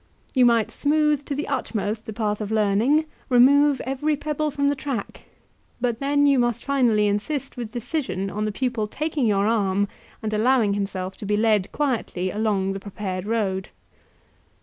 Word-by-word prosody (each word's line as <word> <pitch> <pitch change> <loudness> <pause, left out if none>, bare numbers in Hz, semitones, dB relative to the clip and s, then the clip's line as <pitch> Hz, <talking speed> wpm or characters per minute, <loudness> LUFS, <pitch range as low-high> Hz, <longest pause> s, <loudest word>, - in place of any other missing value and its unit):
You 255 -2 +5
might 230 -2 +2
smooth 300 -1 +1
to 285 - -3
the 290 - -3
utmost 220 -5 -2
the - - -4
path 210 -1 -2
of 210 - -3
learning, 220 +8 +2 0.2
remove 275 +3 +5
every 275 +4 0
pebble 300 +1 -2
from 280 0 0
the 285 - +2
track; 265 -6 -5 0.5
but 240 -2 -1
then 285 +1 +2
you 280 -2 +4
must 240 -2 0
finally 245 -7 +3
insist 265 +8 -2
with 235 -4 -6
decision 245 - -2
on 210 +1 -2
the 215 - -1
pupil 235 -1 -1
taking 300 0 -1
your 200 -1 +2
arm 205 -3 +1 0.4
and 215 0 -2
allowing 220 -1 +3
himself 195 -2 -3
to - - -7
be 210 0 +1
led 215 -3 +2
quietly 230 -10 -1
along 200 -2 0
the 195 - -5
prepared 190 -1 -5
road. 200 -4 -1
230 Hz, 170 wpm, -24 LUFS, 205-275 Hz, 0.5 s, You